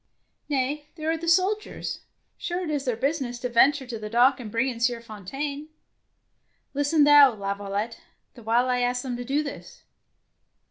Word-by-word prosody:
" - - -48
Nay, 290 +2 -1
there 315 -1 -2
are 325 - -1
the 335 +1 -7
soldiers. 385 +5 0 0.4
Sure, 355 +1 -3
it 320 - -3
is 290 -2 -2
their 250 -3 0
business 265 0 -2
to 250 +1 -4
venture 270 +4 +4
to 235 -3 -6
the 215 0 -6
dock 245 +5 +4
and 230 -4 -7
bring 230 +4 +1
in 245 -3 -4
Sieur 235 0 +1
Fontaine." 270 +8 -6 1.1
''Listen 290 +2 +3
thou, 290 -4 +7
Laviolette, 200 +2 -4 0.3
the 240 - -14
while 235 +3 +2
I 250 -1 +1
ask 245 0 0
them 255 -2 -3
to 245 - -5
do 280 +5 0
this." 285 - -9
255 Hz, 180 wpm, -25 LUFS, 235-290 Hz, 1.1 s, thou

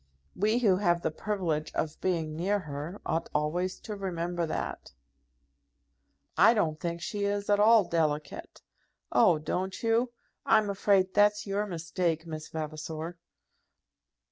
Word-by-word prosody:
We, 215 +4 +2
who 205 -7 +3
have 175 -3 +1
the - - 0
privilege 165 -5 -2
of 155 -1 -2
being 165 -4 -1
near 190 +6 +1
her, 155 +2 -6
ought 165 +1 -1
always 175 +5 -1
to 215 - -6
remember 175 -3 -2
that." 155 - -5 1.4
"I 205 +7 +6
don't 155 -7 0
think 170 0 -4
she 205 +3 -2
is 205 0 -1
at 205 - +4
all 220 0 +6
delicate." 155 -4 -2 0.5
"Oh! 170 - +5
don't 185 +7 -3
you? 230 +2 +2 0.3
I'm 215 -2 +3
afraid 195 -1 +2
that's 210 0 +3
your 205 +1 -1
mistake, 165 -1 -2
Miss 155 -2 -6
Vavasor." 160 +2 -5
175 Hz, 135 wpm, -29 LUFS, 160-205 Hz, 1.4 s, I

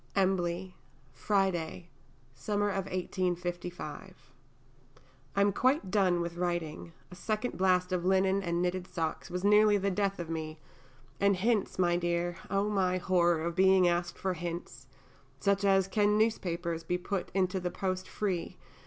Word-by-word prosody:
_) - - +3
EMBLEY, 185 -1 0 0.4
Friday 175 - -1 0.4
[Summer 205 +10 -1
of 195 -1 -2
1855]. 180 -1 -3 1.2
I 200 - +3
am 200 0 +3
quite 255 - +1
done 185 -4 +3
with 170 0 -4
writing, 175 -2 -3 0.2
a - - -9
second 215 +6 -2
blast 180 0 +2
of 180 -2 0
linen 190 +1 +2
and 170 -1 -1
knitted 180 0 -2
socks 165 -3 -3
was 180 +1 -4
nearly 210 0 +5
the 200 0 0
death 200 0 0
of 175 - -5
me, 160 -1 -5 0.6
and 200 0 +4
'hints,' 210 +2 0
my 175 -2 +2
dear! 175 0 -1
oh, 200 +1 +1
my 190 -3 +1
horror 175 -3 +2
of 170 0 -2
being 190 -1 +5
asked 175 0 0
for 190 -1 -1
hints, 170 0 -6 0.5
such 200 0 +1
as 195 -1 +4
"can 210 +1 +2
newspapers 170 -6 -1
be 180 - -1
put 185 +1 -3
into 190 0 +1
the 180 0 -2
post 185 0 -3
free?" 190 -5 -3
185 Hz, 155 wpm, -30 LUFS, 175-195 Hz, 1.2 s, nearly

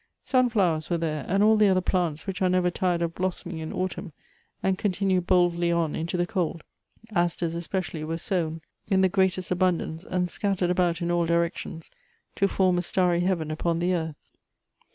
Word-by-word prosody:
Sun 255 -2 +3
flowers 180 -8 +1
were 170 - +1
there, 155 -3 -2
and 195 +3 +2
all 220 +1 +6
the 210 -1 +5
other 190 -1 +4
plants 175 -4 -1
which 195 -2 -4
are 185 - +3
never 180 -1 +2
tired 175 -1 0
of 165 0 -2
blossom 185 0 -3
ing 170 - -5
in 160 0 -5
autumn, 185 -3 -4 0.5
and 190 0 +2
continue 190 -1 +1
boldly 175 -1 +2
on 170 -3 0
into 170 +3 -2
the 175 - +1
cold:. 170 -3 -2 0.5
asters 170 -2 0
especially 170 -1 -3
were 165 +1 -3
sown 165 -2 -1 0.3
in 190 -2 +3
the 190 - +4
greatest 190 -1 +1
abundance, 180 -2 0
and 180 -2 -1
scattered 190 -3 0
about 180 -1 +1
in 170 - 0
all 170 -1 +1
directions, 170 -1 -2 0.4
to 195 - +2
form 185 -2 +2
a - - +1
starry 180 -1 +1
heaven 175 -4 0
upon 165 +2 -1
the 175 +2 +1
earth. 160 -3 -4
175 Hz, 190 wpm, -26 LUFS, 170-185 Hz, 0.5 s, all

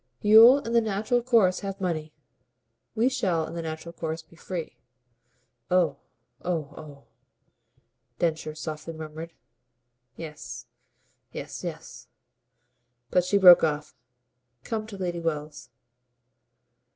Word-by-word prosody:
"You'll 225 +5 +9
in 230 - -5
the 235 - +5
natural 220 +3 0
course 225 -7 +3
have 195 -1 -6
money. 160 -4 -2 0.8
We 230 +2 +3
shall 185 -11 0
in - - -9
the 170 - -4
natural 160 +1 -6
course 160 -1 -4
be 160 +1 -21
free." 165 -7 -6 0.9
"Oh, 175 -6 +2 0.5
oh, 160 -5 -3
oh!" 145 -2 -12 1.1
Densher 160 -2 -1
softly 155 +1 -6
murmured. 160 +1 -8 0.8
"Yes, 155 -2 -8 0.7
yes, - - -7
yes." - - -8 1.0
But 180 - +3
she 200 +3 +2
broke 180 -3 +9
off. 150 -1 -1 0.7
"Come 215 -2 -4
to 205 -3 -9
Lady 175 -2 -3
Wells." 150 -2 -4
170 Hz, 115 wpm, -26 LUFS, 155-195 Hz, 1.1 s, You'll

